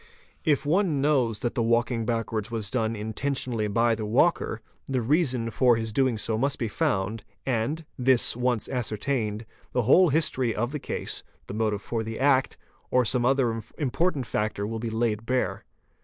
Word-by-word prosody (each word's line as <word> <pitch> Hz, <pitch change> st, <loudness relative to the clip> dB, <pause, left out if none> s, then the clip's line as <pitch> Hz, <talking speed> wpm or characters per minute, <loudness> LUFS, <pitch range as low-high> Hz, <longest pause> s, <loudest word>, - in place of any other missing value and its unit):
If 145 Hz, -3 st, +2 dB
one 165 Hz, -1 st, +2 dB
knows 130 Hz, -7 st, +1 dB
that 120 Hz, -, -1 dB
the -, -, 0 dB
walking 115 Hz, 0 st, +1 dB
back 115 Hz, -3 st, -1 dB
wards 110 Hz, -1 st, -2 dB
was 110 Hz, -4 st, -3 dB
done 115 Hz, -2 st, 0 dB
intentionally 110 Hz, +1 st, -2 dB
by 115 Hz, +3 st, +2 dB
the 110 Hz, -1 st, -3 dB
walker, 115 Hz, +2 st, +2 dB, 0.3 s
the 130 Hz, -1 st, 0 dB
reason 125 Hz, -3 st, +1 dB
for 125 Hz, -1 st, +4 dB
his 110 Hz, -1 st, -3 dB
doing 130 Hz, -3 st, +2 dB
so 110 Hz, +1 st, -1 dB
must 140 Hz, +3 st, 0 dB
be 115 Hz, -, -2 dB
found, 100 Hz, +1 st, -1 dB, 0.2 s
and, 135 Hz, +6 st, -1 dB
this 125 Hz, -2 st, +4 dB
once 125 Hz, -2 st, 0 dB
ascertained, 110 Hz, -2 st, -2 dB, 0.3 s
the 125 Hz, -, +1 dB
whole 170 Hz, -, +6 dB
history 130 Hz, -6 st, +1 dB
of 120 Hz, +4 st, -1 dB
the 150 Hz, -, -3 dB
case, -, -, -4 dB, 0.2 s
the -, -, -7 dB
motive 105 Hz, -1 st, -1 dB
for 115 Hz, -2 st, -2 dB
the 110 Hz, 0 st, -5 dB
act, 135 Hz, -1 st, +2 dB, 0.3 s
or 125 Hz, -1 st, +3 dB
some 120 Hz, +1 st, +1 dB
other 125 Hz, -4 st, +1 dB, 0.2 s
important 145 Hz, 0 st, 0 dB
factor 105 Hz, -2 st, -2 dB
will 110 Hz, +1 st, -4 dB
be 115 Hz, 0 st, -3 dB
laid 110 Hz, -1 st, -1 dB
bare. 125 Hz, 0 st, -1 dB
120 Hz, 175 wpm, -26 LUFS, 110-135 Hz, 0.3 s, whole